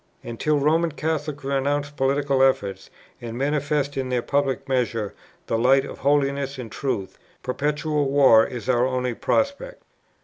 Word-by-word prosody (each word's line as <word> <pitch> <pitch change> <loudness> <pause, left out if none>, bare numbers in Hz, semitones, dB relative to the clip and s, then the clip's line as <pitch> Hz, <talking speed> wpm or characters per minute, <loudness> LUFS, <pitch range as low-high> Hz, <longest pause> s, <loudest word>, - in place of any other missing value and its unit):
And 120 -1 -7
till 150 -1 +2
Roman 160 +4 +2
Catholics 150 -2 -3
renounce 140 +1 -1
political 140 -1 +1
efforts, 100 -8 +1 0.3
and 115 -1 -6
manifest 145 +1 -1
in 130 -1 -2
their 125 -2 0
public 140 -2 -1
measures 120 -5 -1 0.3
the 115 - -1
light 135 +3 +4
of - - -9
holiness 140 -1 +1
and 120 -4 -7
truth, 105 -9 -3 0.2
perpetual 150 +2 -1
war 135 -5 +6
is 120 -1 -6
our 125 0 +3
only 125 -1 -1
prospect." 280 - -1
135 Hz, 145 wpm, -23 LUFS, 125-145 Hz, 0.3 s, war